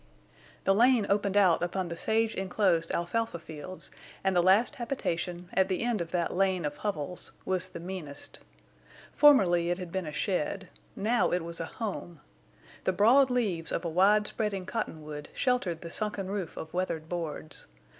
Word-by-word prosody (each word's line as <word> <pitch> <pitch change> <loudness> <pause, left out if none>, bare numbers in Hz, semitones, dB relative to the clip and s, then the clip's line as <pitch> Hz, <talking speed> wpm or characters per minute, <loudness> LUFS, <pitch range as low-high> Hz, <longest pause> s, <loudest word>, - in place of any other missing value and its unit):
The 195 - +4
lane 235 +1 +4
opened 200 0 +1
out 185 -5 +5
upon 175 +1 -2
the 170 - -4
sage 220 +5 +1
inclosed 185 -3 +1
alfalfa 225 +3 -1
fields, 160 +3 -9 0.3
and 190 -1 +1
the 175 - +5
last 190 +7 +4
habitation, 180 -8 -3
at 190 0 +3
the 190 +3 -1
end 235 -5 0
of 165 - -4
that 170 -1 -1
lane 185 -2 +1
of 145 0 -3
hovels, 180 -4 -3
was 185 -1 0
the - - -8
meanest. 165 -5 -7 0.7
Formerly 180 -13 +5
it 175 - 0
had 180 -3 -7
been 190 -3 -2
a - - -4
shed; 185 +3 -2 0.3
now 230 +4 +2
it 180 -1 0
was 170 0 -4
a 165 - -2
home. 185 -7 -5 0.7
The 185 - +2
broad 245 +8 +5
leaves 205 -10 0
of - - -2
a - - 0
wide 200 +5 +4
spreading 205 -4 -2
cottonwood 155 -7 -5
sheltered 245 -11 0
the 170 - -7
sunken 205 -2 -2
roof 195 -5 -4
of 160 - -7
weathered 170 -3 -2
boards. 160 -3 -5
185 Hz, 170 wpm, -29 LUFS, 170-210 Hz, 0.7 s, out